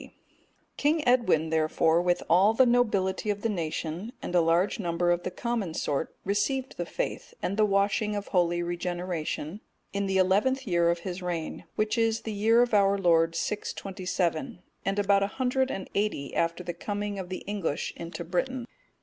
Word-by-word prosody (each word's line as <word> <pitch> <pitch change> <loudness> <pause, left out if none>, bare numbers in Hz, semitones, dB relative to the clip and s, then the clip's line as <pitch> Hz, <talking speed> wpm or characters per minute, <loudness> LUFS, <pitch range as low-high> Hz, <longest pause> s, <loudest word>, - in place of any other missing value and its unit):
D.] - - -14 0.6
King 295 0 +1
Edwin, 185 -11 +3
therefore, 160 +1 +3
with 175 0 +1
all 190 +6 +5
the 260 - +6
nobility 215 -5 +1
of 205 -1 -2
the 230 - +1
nation, 170 +3 -3
and - - -6
a 175 - +5
large 170 +7 +2
number 175 -2 +1
of 175 0 +1
the - - -3
common 205 -3 -3
sort, 145 +2 -2
received 215 +7 0
the - - -3
faith, - - -4
and 195 - 0
the 215 0 +3
washing 200 +1 +1
of 205 0 -4
holy 175 -2 +2
regeneration, 175 0 -3 0.3
in 200 0 -1
the 190 0 +1
eleventh 210 +9 +2
year 170 -4 +2
of 170 0 0
his 185 +1 -5
reign, 175 -3 -4
which 215 +2 0
is 225 -1 +2
the 220 - -5
year 225 +4 +4
of 245 - -3
our 200 -1 +4
Lord 165 -3 +3
627, 185 +2 -2 0.2
and 195 +1 -1
about 200 -1 +3
one 200 - +1
hundred 260 +3 0
and 195 - -4
eighty 200 -9 -1
after 170 +1 0
the 175 -1 -4
coming 205 +3 -4
of 180 -2 -6
the 185 - -5
English 195 -7 -2
into 170 +1 -6
Britain. 240 +9 -2
195 Hz, 180 wpm, -28 LUFS, 175-215 Hz, 0.6 s, the